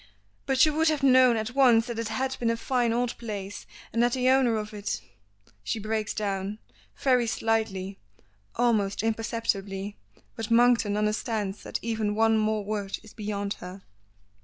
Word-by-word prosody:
"But 265 Hz, +1 st, +5 dB
you 305 Hz, -, 0 dB
would 320 Hz, +2 st, +2 dB
have 300 Hz, -3 st, -1 dB
known 255 Hz, -3 st, +6 dB
at 220 Hz, +2 st, -3 dB
once 245 Hz, -4 st, +5 dB
that 235 Hz, -2 st, -5 dB
it 230 Hz, -, -2 dB
had 260 Hz, +4 st, -2 dB
been 235 Hz, -, +1 dB
a 230 Hz, -, 0 dB
fine 240 Hz, -1 st, 0 dB
old 240 Hz, +1 st, 0 dB
place, 205 Hz, -3 st, -6 dB, 0.3 s
and 230 Hz, -, +2 dB
that 240 Hz, 0 st, +3 dB
the 255 Hz, 0 st, +2 dB
owner 260 Hz, -4 st, +4 dB
of 215 Hz, 0 st, -5 dB
it 205 Hz, -1 st, -3 dB, 0.3 s
" 100 Hz, 0 st, -33 dB
She 165 Hz, -, -2 dB
breaks 215 Hz, 0 st, -2 dB
down, 200 Hz, -1 st, -2 dB, 0.4 s
very 250 Hz, -3 st, +2 dB
slightly, 215 Hz, -4 st, -1 dB, 0.6 s
almost 215 Hz, -5 st, +1 dB
imperceptibly, 215 Hz, -3 st, -2 dB, 0.4 s
but 225 Hz, -1 st, -5 dB
Monkton 230 Hz, -3 st, +4 dB
understands 210 Hz, -1 st, -1 dB
that -, -, -4 dB
even 220 Hz, -2 st, -1 dB
one 225 Hz, 0 st, +3 dB
more 215 Hz, -1 st, 0 dB
word 205 Hz, -2 st, -3 dB
is 215 Hz, -, -15 dB
beyond 205 Hz, -2 st, -3 dB
her. 180 Hz, +2 st, -9 dB
220 Hz, 165 wpm, -27 LUFS, 205-240 Hz, 0.6 s, known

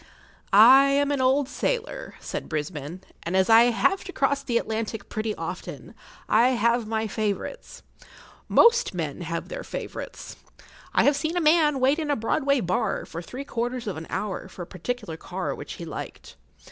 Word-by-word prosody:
I 250 Hz, +7 st, +8 dB
am 280 Hz, +1 st, +2 dB
an 280 Hz, -2 st, 0 dB
old 265 Hz, +2 st, +3 dB
sailor, 480 Hz, -, -3 dB
said -, -, -6 dB
Brisbane, 155 Hz, +2 st, -4 dB, 0.2 s
and 175 Hz, +3 st, -1 dB
as 190 Hz, +4 st, +3 dB
I 225 Hz, +1 st, +8 dB
have 370 Hz, +11 st, +1 dB
to 375 Hz, -, -6 dB
cross 280 Hz, -3 st, +1 dB
the 245 Hz, -4 st, 0 dB
Atlantic 220 Hz, -2 st, -3 dB
pretty 215 Hz, 0 st, -2 dB
often, -, -, -7 dB, 0.3 s
I 245 Hz, +3 st, +4 dB
have 235 Hz, 0 st, +2 dB
my 220 Hz, 0 st, -1 dB
favourites. 215 Hz, -, -4 dB, 0.7 s
Most 475 Hz, -, +5 dB
men 160 Hz, -2 st, -4 dB
have 170 Hz, 0 st, -4 dB
their -, -, -5 dB
favourites. -, -, -7 dB, 0.5 s
I -, -, +3 dB
have 285 Hz, -, +4 dB
seen 315 Hz, +5 st, -2 dB
a -, -, +3 dB
man 305 Hz, -3 st, +4 dB
wait 270 Hz, +5 st, +3 dB
in 310 Hz, -2 st, -3 dB
a 290 Hz, -, +2 dB
Broadway 270 Hz, +4 st, +1 dB
bar 180 Hz, -1 st, -1 dB
for 165 Hz, -, -7 dB
three 255 Hz, +10 st, -8 dB
quarters 245 Hz, -1 st, -3 dB
of 205 Hz, -, -3 dB
an 160 Hz, +1 st, -7 dB
hour 195 Hz, -2 st, -3 dB
for 180 Hz, -1 st, -8 dB
a -, -, -8 dB
particular 195 Hz, -1 st, -5 dB
car -, -, -4 dB
which -, -, -8 dB
he -, -, -8 dB
liked. -, -, -8 dB
235 Hz, 175 wpm, -25 LUFS, 195-280 Hz, 0.7 s, I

